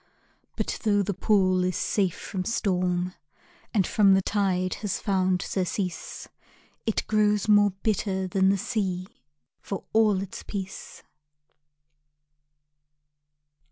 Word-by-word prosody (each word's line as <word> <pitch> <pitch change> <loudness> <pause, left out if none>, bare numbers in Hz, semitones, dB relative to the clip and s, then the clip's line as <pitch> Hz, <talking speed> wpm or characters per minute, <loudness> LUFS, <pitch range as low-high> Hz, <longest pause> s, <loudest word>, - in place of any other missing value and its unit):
But - - -2
tho' 205 -2 +2
the 200 - -2
pool 185 -1 +2
is 185 0 0
safe 190 -4 0
from 185 -2 -4
storm 180 -4 0 0.6
And 200 -5 +2
from 200 -2 +4
the 190 - +3
tide 185 -3 0
has 205 -3 -2
found 185 -2 +1
surcease, 185 -1 -3 0.6
It 225 - 0
grows 210 -1 +2
more 205 -1 +6
bitter 195 -3 0
than 190 +1 +2
the 200 - +3
sea, 190 -3 -2 0.6
For 195 - -5
all 215 -3 +4
its 195 0 -6
peace. 190 -2 -7
195 Hz, 115 wpm, -26 LUFS, 185-205 Hz, 0.6 s, more